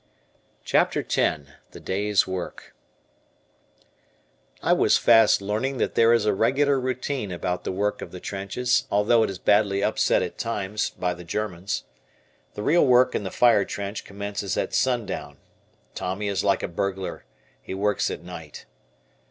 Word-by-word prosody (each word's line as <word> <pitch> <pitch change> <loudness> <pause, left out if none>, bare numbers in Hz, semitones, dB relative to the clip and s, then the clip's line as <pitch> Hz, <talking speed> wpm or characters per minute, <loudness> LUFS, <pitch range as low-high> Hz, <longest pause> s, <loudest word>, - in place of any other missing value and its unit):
CHAPTER - - +2
X 80 - +1 0.3
"THE - - -12
DAY'S 100 0 +1
WORK" 95 -1 -6 1.9
I - - +4
was - - +4
fast 115 -3 +5
learning 110 +7 -2
that - - -1
there 115 0 +4
is 115 -2 +3
a 105 - +3
regular 135 +6 +2
routine 130 -3 -3
about 90 +1 -3
the - - -1
work 105 +2 -1
of - - -7
the 90 - -8
trenches, 100 +7 -1
although 105 +3 +3
it 110 - +1
is 95 - -5
badly 100 0 +2
upset 110 - +2
at 90 - -6
times 105 -3 -2
by 90 -1 -2
the 90 0 -10
Germans. 95 +1 -3 0.7
The 105 - -5
real 165 +8 +4
work 125 0 +5
in - - -1
the 95 - -4
fire 120 -1 +4
trench 100 +1 -5
commences 100 -1 -4
at - - -2
sundown. 105 - -1 0.6
Tommy 100 +3 -3
is 100 -3 -1
like 100 -2 +1
a - - -1
burglar, 95 +1 -4 0.4
he - - -6
works 105 +1 0
at - - -6
night. 80 -4 -10
100 Hz, 155 wpm, -24 LUFS, 95-115 Hz, 1.9 s, fast